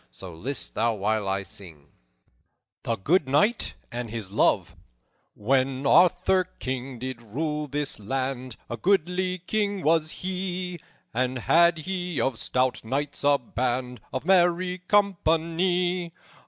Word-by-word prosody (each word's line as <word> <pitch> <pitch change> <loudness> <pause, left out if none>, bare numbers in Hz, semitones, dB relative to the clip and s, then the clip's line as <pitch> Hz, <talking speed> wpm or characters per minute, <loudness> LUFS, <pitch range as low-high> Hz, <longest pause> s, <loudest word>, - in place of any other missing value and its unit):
So, 85 +9 -10
list 125 +11 -5
thou 115 +1 +1
while 105 0 0
I 95 0 -1
sing:" 85 -6 -13 0.9
THE 115 - -1
GOOD 150 - +2
KNIGHT 205 - +2 0.2
AND 120 -1 -4
HIS 105 -4 -5
LOVE - - +2 0.6
"_When 130 +4 +1
Arthur, 180 +3 +4
King, 130 0 -4
did 130 0 -6
rule 150 +7 -3
this 145 -2 -2
land, 130 +2 -3
A 120 - -5
goodly 185 - +1
king 200 +1 -1
was 155 0 +3 0.2
he, 180 -1 -3 0.3
And 130 +2 0
had 170 +7 +4
he 180 -1 -3
of 130 -4 0
stout 130 0 0
knights 140 +6 -3
a 145 0 +5
band 125 0 -3
Of 130 +2 -4
merry 180 0 +3
company. 175 -2 +1
145 Hz, 125 wpm, -26 LUFS, 120-180 Hz, 0.9 s, a